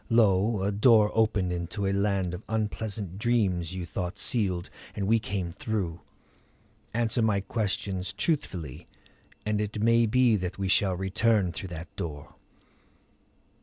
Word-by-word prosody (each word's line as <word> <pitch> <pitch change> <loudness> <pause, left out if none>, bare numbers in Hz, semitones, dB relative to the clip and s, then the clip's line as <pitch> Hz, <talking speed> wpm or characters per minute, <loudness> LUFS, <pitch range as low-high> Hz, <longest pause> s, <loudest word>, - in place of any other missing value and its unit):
Lo, 105 -2 +3
a 100 - +1
door 105 0 +5
opened 105 -5 +1
into 90 +4 -3
a 95 - +1
land 100 -3 0
of 90 - -6
unpleasant 105 -3 -3
dreams 95 -7 +1
you 90 -2 -4
thought 90 +2 -4
sealed, 95 -8 +2 0.3
and 100 - -2
we 115 +3 +3
came 95 -5 -3
through. 90 -4 -3 0.9
Answer 115 0 0
my 110 -3 +2
questions 100 -2 -2
truthfully 100 - -3 0.6
and 105 0 0
it 105 0 -3
may 115 +1 +4
be 125 0 +4
that 90 -1 -4
we 95 -1 -2
shall 95 -1 +3
return 95 0 +1
through 95 +2 -6
that 85 0 -8
door." 75 -4 -6
100 Hz, 140 wpm, -28 LUFS, 90-110 Hz, 0.9 s, door